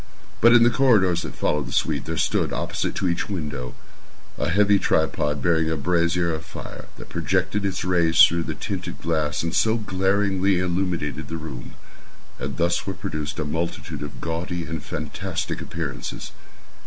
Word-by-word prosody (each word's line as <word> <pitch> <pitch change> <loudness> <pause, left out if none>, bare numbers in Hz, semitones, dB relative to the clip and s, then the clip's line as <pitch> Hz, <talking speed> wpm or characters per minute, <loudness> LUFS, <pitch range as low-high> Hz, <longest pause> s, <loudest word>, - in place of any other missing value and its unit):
But 120 - +8
in 120 -1 +8
the 120 - +5
corridors 100 -11 +4
that - - -6
followed 75 -3 0
the - - -7
suite, - - 0
there - - -3
stood, - - +1
opposite - - -2
to 95 - 0
each 85 +2 -1
window, 75 -9 -4 0.6
a - - -1
heavy 100 +3 +4
tripod, 75 -5 +1
bearing 80 -2 +3
a 80 - 0
brazier 85 +2 +1
of 80 0 -4
fire - - -9
that - - -10
projected 105 0 0
its 95 -2 -1
rays 85 -3 +2
through 85 0 +7
the 80 - -3
tinted 95 -3 -5
glass 80 -3 0
and 85 - -2
so 110 +1 +3
glaringly 95 -1 +1
illumined 85 -4 -1
the 80 - -4
room. 75 -6 -8 0.6
And 70 -2 -4
thus 85 +3 +1
were 95 - -2
produced 80 -6 -4
a 75 - -2
multitude 80 +2 -3
of 75 -1 -7
gaudy 85 +1 -3
and 80 -2 -4
fantastic 75 0 -4
appearances. 80 -7 -5
85 Hz, 165 wpm, -24 LUFS, 80-95 Hz, 0.6 s, But